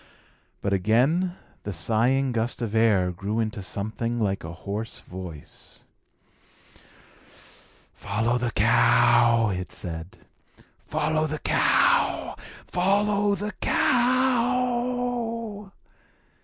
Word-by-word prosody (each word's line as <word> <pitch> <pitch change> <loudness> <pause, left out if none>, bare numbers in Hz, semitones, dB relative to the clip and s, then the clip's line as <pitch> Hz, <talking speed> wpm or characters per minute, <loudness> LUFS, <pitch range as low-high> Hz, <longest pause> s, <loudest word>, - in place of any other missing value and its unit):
But 100 - 0
again 130 - +2 0.3
the 105 - -5
sighing 115 - +1
gust 115 0 -2
of 110 -2 -4
air 105 -5 +3
grew 100 +5 -3
into 110 -1 -2
something 110 +5 -3
like 100 -3 -1
a 80 - -6
hoarse 100 +5 -5
voice. 90 -5 -10 2.1
"Follow 115 +4 -1
the 120 -1 -1
cow!" 120 0 +4
it 90 -1 -5
said. 80 0 -7 0.6
"Follow 155 0 -1
the 155 0 -3
cow! - - +2 0.3
Follow 200 +2 +1
the 210 +1 -4
cow!" 245 -3 0
120 Hz, 90 wpm, -25 LUFS, -, 2.1 s, cow